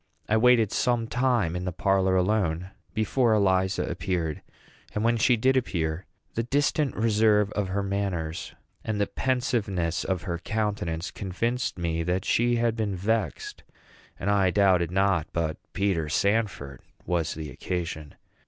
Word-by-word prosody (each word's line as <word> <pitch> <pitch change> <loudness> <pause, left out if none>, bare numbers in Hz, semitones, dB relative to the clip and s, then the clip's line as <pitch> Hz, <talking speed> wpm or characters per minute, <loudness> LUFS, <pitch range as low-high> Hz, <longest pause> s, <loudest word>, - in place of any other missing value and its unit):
I 110 - +2
waited 115 -2 +4
some 120 -2 +1
time 120 -8 +1
in 90 - -3
the 90 - -2
parlor 95 +1 +2
alone 90 -2 0 0.2
before 110 +2 +2
Eliza 95 -2 +2
appeared; 85 -5 -2 0.5
and 105 - 0
when 115 +1 +3
she 120 +2 +3
did 130 +4 +3
appear, 85 -8 -1 0.3
the 115 - 0
distant 145 +3 0
reserve 105 -2 +3
of 105 -2 -1
her 100 +2 -1
manners 95 -5 -3 0.3
and 110 -2 -2
the 100 - +3
pensiveness 105 -11 -1
of 95 -3 -2
her 85 -2 -3
countenance 100 -5 -2
convinced 115 +6 -2
me 85 -1 -1
that 90 +2 -1
she 120 +1 +2
had 115 -1 +1
been 105 -4 -1
vexed, 110 +3 -2 0.6
and 100 - 0
I 100 -2 +3
doubted 90 -3 +3
not 95 -3 +1
but 80 -2 -1
Peter 90 -5 0
Sanford 95 - 0 0.2
was 85 -3 -1
the 75 -2 -6
occasion. 80 -4 -4
100 Hz, 145 wpm, -26 LUFS, 90-110 Hz, 0.6 s, waited